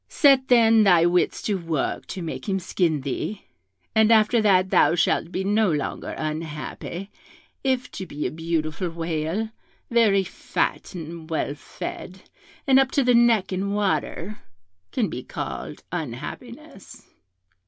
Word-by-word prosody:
Set, 270 -3 +4
then, 225 -2 +6
thy 175 -4 +5
wits 175 +1 +1
to 200 -3 -1
work 165 -4 -2
to 185 - -5
make 165 +5 -5
him 195 - +1
skin 170 -4 0
thee, 140 +10 -4 0.5
and 220 0 +4
after 225 +1 +5
that 190 -3 +3
thou - - +5
shalt 165 0 +1
be 190 - -2
no 205 0 +2
longer 150 -2 -3
unhappy, 155 +4 -5 0.5
if 260 -2 0
to 190 - -6
be 150 -2 -5
a - - -1
beautiful 160 +1 -2
whale, 165 +5 -2 0.4
very 215 -5 +4
fat 190 - -3
and 165 -1 -8
well 155 -3 -1
fed, 190 - -8 0.4
and 270 -1 +6
up 265 -1 +3
to 280 0 +1
the 250 0 +4
neck 235 -5 +4
in 195 +2 -1
water, 205 -1 -1 0.5
can - - 0
be - - -5
called - - -6
unhappiness.' - - -7
190 Hz, 145 wpm, -24 LUFS, 165-220 Hz, 0.5 s, then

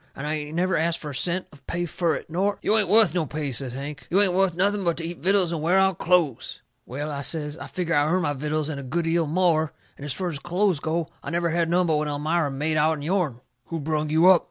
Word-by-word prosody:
And 135 - -6
I 150 - -1
ain't 150 0 -4
never 185 +1 +1
ast 165 +1 +1
fur 150 - -7
a - - -7
cent 180 +6 0
of 140 -3 -19
pay 175 +1 -2
fur 170 -1 0
it, - - -7
nor 190 +5 0
" - - -37
"You 215 - +3
ain't 215 -4 +2
wuth 220 +1 +5
no 170 -4 0
pay," 150 -1 -3
says 125 0 -3
Hank. 145 +2 -7
"You 190 - +3
ain't 195 -3 +3
wuth 190 -2 +2
nothing 200 +2 +1
but 170 -2 0
to 165 - -4
eat 170 +1 -6
vittles 185 -1 +2
and 165 -3 -2
wear 175 +4 +3
out 190 -2 +3
clothes." 170 -8 +1 0.3
"Well," 145 +5 -4
I 140 -1 -4
says, 150 0 0
"I - - -8
figger 175 -2 -2
I 145 -1 +3
earn 180 +3 +1
my 145 - 0
vittles 150 +2 -2
and 145 -3 -4
a - - -6
good 165 +6 -2
'eal 165 -1 +1
more. 160 -2 +2 0.2
And - - -11
as 145 - -3
fur 185 +3 -2
as 150 -4 -5
clothes 180 +1 +1
goes, 160 +2 -1 0.2
I - - -6
never 170 0 0
had 165 0 +1
none 180 +1 +3
but 160 -3 +2
what 150 0 -1
Elmira 150 +2 0
made 150 +3 -1
out'n 155 -1 +1
yourn." 160 -8 -1 0.2
"Who 165 - -4
brung 155 0 -1
you 160 +3 +4
up?" 180 - +6
165 Hz, 275 wpm, -25 LUFS, 150-180 Hz, 0.3 s, up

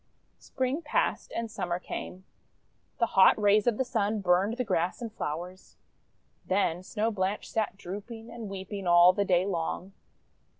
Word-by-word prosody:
Spring 260 +4 -2
passed, 300 - -1
and 230 -1 -3
Summer 175 -5 -2
came. 180 +1 -7 0.7
The 235 - +3
hot 190 +2 +6
rays 205 +1 +4
of 235 -3 +2
the 260 - 0
Sun 215 -3 0
burned 190 +5 +2
the 250 - 0
grass 175 -5 -1
and 230 -3 -6
flowers. 180 +2 -6 0.7
Then 185 -3 0
Snow 215 +4 -1
Blanche 195 0 -2
sat 215 -3 -2
drooping 220 +5 -8
and 230 -3 -7
weeping 195 0 -6
all 175 +1 +7
the 200 +1 0
day 180 -1 +3
long. 185 +1 -3
200 Hz, 155 wpm, -29 LUFS, 185-225 Hz, 0.7 s, all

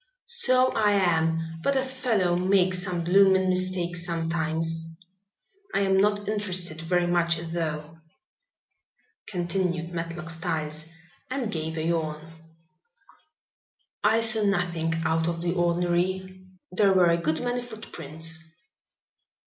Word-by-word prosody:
"So 255 - +3
I 210 -1 +2
am, 165 -3 +1
but 280 +10 +1
a 265 - +2
fellow 230 -9 +1
makes 185 0 +2
some 180 -2 -2
bloomin' 190 +1 +4
mistakes 180 -2 -1
sometimes. 165 -1 -1 0.9
I - - +3
am 195 -1 +2
not 205 +1 +2
interested 185 -6 -1
very 175 +1 +1
much 170 -1 +2
though," 160 -1 -4 1.3
continued 175 -2 -2
Matlock 165 0 -4
Styles, 155 -1 -3 0.4
and 255 -4 -2
gave 160 -2 -3
a 155 - -1
yawn. 160 -1 -2 1.7
"I 220 +2 +4
saw 225 -1 +3
nothing 175 -5 0
out 160 +1 +1
of 170 0 -2
the 175 0 0
ordinary. 180 +2 0 0.2
There 195 +1 +3
were 180 -2 +5
a 170 0 +1
good 160 -1 0
many 245 0 -1
footprints." 165 -8 -5
175 Hz, 115 wpm, -26 LUFS, 165-195 Hz, 1.7 s, were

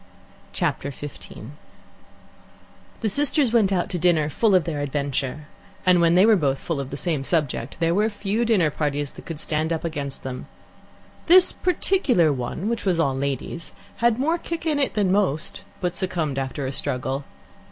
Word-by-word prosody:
Chapter 140 - -1
15 145 0 -9 1.5
The 225 - 0
sisters 285 +1 +2
went 215 -5 +4
out 180 -2 +1
to 180 - -2
dinner 160 -3 +2
full 215 +1 +3
of 180 - +4
their 155 -2 -3
adventure, 140 0 -2 0.4
and 180 -1 +5
when 170 0 +4
they 185 +3 +6
were 220 -1 +6
both 140 -7 +1
full 165 -1 -3
of 135 -1 -4
the 140 - -5
same 155 -4 -1
subject, 145 -5 -1
there 165 0 +2
were 210 +4 +2
few 210 +2 -1
dinner 200 -10 +3
parties 145 -1 -2
that - - -13
could 165 -3 -5
stand 155 +1 -1
up 165 - -1
against 145 -4 -4
them. 130 -1 -6 0.8
This 360 +2 +7
particular 310 - +2
one, 130 - -4
which 230 0 -1
was 180 -4 +1
all 140 -4 +2
ladies, 140 +4 -3 0.2
had 235 -1 +3
more 320 +6 +1
kick 335 0 -5
in 305 -3 +1
it 275 - 0
than 200 -4 +2
most, 185 -6 0 0.2
but 180 -1 0
succumbed 170 -7 -1
after 135 +1 -3
a 130 - -2
struggle. 130 +1 -2
165 Hz, 175 wpm, -24 LUFS, 140-210 Hz, 1.5 s, This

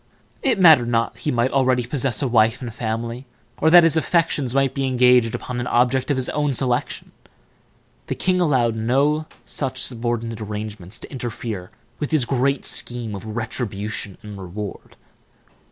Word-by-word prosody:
It 255 -7 +1
mattered 155 -9 +7
not 115 -1 0
that 115 - -20
he - - -1
might 120 +1 +1
already 130 -3 +2
possess 130 -1 -1
a - - +1
wife 115 0 +3
and 120 -4 -6
family, 115 +2 -4 0.3
or 160 - +4
that 175 +1 +8
his 165 -2 +5
affections 155 -6 +1
might 135 -1 +2
be 135 -1 -1
engaged 125 -2 +4
upon 125 -1 -5
an 120 - -3
object 125 +2 +2
of 145 - +1
his 130 - 0
own 145 -2 0
selection; 125 -2 -1 1.0
the - - -2
king 185 -1 +1
allowed 125 -8 +2
no 140 +7 +1 0.2
such 135 -3 -3
subordinate 115 -2 -2
arrangements 105 -2 -6
to - - -11
interfere 115 -7 -5 0.3
with 150 - -2
his 155 -6 +2
great 135 +2 0
scheme 120 -3 -3
of 100 +2 -7
retribution 105 -4 -3
and 105 -2 -9
reward. 100 +3 -7
125 Hz, 165 wpm, -22 LUFS, 115-135 Hz, 1.0 s, that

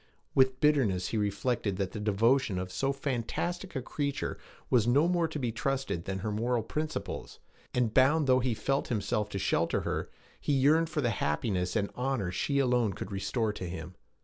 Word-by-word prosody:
With 130 -1 +3
bitterness 130 -12 +2
he 115 - -1
reflected 105 0 0
that 95 -2 -1
the 105 - -5
devotion 110 +1 +2
of 90 0 -4
so 135 +8 0
fantastic 140 - -3
a 130 - -2
creature 140 +1 -3 0.3
was 120 -3 +3
no 140 +7 +4
more 175 -2 +2
to 160 - -5
be 125 -5 -1
trusted 130 -6 -2
than 95 0 -2
her 105 - 0
moral 115 +2 0
principles; 155 0 -4 0.4
and 120 -3 +1
bound 145 +5 +5
though 130 -1 +5
he 125 -2 0
felt 135 +6 0
himself 105 -2 -1
to 100 - -4
shelter - - +1
her, - - -2 0.3
he 145 - 0
yearned 155 +5 +4
for 155 -1 -1
the 120 -3 +1
happiness 90 +1 -1
and 100 -2 0
honor 125 -8 -1
she 140 +10 0
alone 125 -6 +2
could 95 - -7
restore 100 +3 -1
to 90 -4 -5
him. 90 0 -6
120 Hz, 185 wpm, -30 LUFS, 105-135 Hz, 0.4 s, bound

